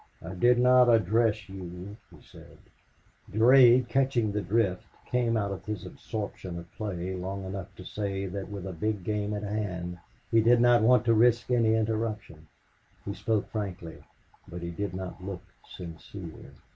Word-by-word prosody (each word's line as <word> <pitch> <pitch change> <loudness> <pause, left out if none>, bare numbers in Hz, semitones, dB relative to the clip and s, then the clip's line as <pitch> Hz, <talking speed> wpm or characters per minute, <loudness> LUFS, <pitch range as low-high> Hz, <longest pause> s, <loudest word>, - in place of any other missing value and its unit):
"I 85 +3 -6
did 120 +6 +4
not 125 0 +6
address 110 -1 +2
you," 95 +1 -8
he - - -17
said. - - -15 0.7
Durade, 125 +2 +6
catching 120 -3 +1
the 105 +1 -1
drift, 100 -1 0 0.2
came 120 -2 +1
out 100 -2 -1
of 100 - -6
his 105 -4 -5
absorption 100 -4 -6
of 85 0 -10
play 95 -4 -4
long 95 +1 -5
enough 95 -1 -5
to 90 - -11
say 100 -1 -3
that 95 +1 -5
with 100 -3 -6
a 95 - -5
big 105 +3 -2
game 105 +1 -2
at 105 - -4
hand 90 -4 -4 0.3
he 115 - +5
did 120 +2 +5
not 120 -1 +5
want 120 +1 +4
to 115 - +4
risk 120 +2 +3
any 115 -2 +3
interruption. 110 -7 -2 0.6
He 100 - -3
spoke 110 0 -1
frankly, 90 -6 -5 0.4
but 85 0 -8
he 85 - -4
did 90 +1 -4
not 95 0 -7
look 95 -1 -6 0.3
sincere. 85 0 -10
105 Hz, 165 wpm, -28 LUFS, 90-115 Hz, 0.7 s, not